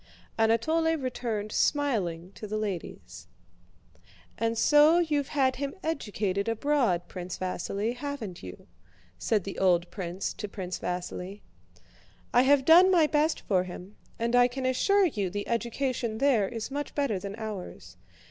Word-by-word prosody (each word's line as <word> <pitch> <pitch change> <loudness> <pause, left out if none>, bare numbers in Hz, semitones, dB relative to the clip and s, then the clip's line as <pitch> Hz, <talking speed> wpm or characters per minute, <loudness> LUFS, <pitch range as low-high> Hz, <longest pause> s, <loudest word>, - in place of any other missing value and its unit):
Anatole 315 +9 +2
returned 235 -6 -3
smiling 195 - 0
to 215 - -8
the 215 +1 -3
ladies. 200 -5 -6 1.1
"And 230 0 -1
so 295 +6 +6
you've 300 -5 +1
had 265 -3 +1
him 280 +4 -4
educated 205 - -2
abroad, 230 -8 +1
Prince 180 0 -6
Vasíli, 200 +5 -3
haven't 250 -10 -6
you?" 90 -1 -10 0.5
said 215 -4 +1
the 195 - -6
old 175 -2 +2
prince 185 0 -4
to 210 - -6
Prince 185 -2 -5
Vasíli. 180 +2 -5 0.9
"I 245 - +6
have 270 0 +4
done 350 +4 +8
my 345 -4 +5
best 300 +1 +1
for 185 -3 +1
him, 185 +2 -10 0.2
and 235 +1 0
I 245 0 +6
can 260 +1 -5
assure 390 +11 +3
you 205 - -1
the 205 +3 -4
education 235 -1 -2
there 245 -6 +2
is 230 +1 -5
much 290 +1 -4
better 275 -9 0
than 200 +2 -6
ours." 215 -5 -7
230 Hz, 145 wpm, -28 LUFS, 195-280 Hz, 1.1 s, done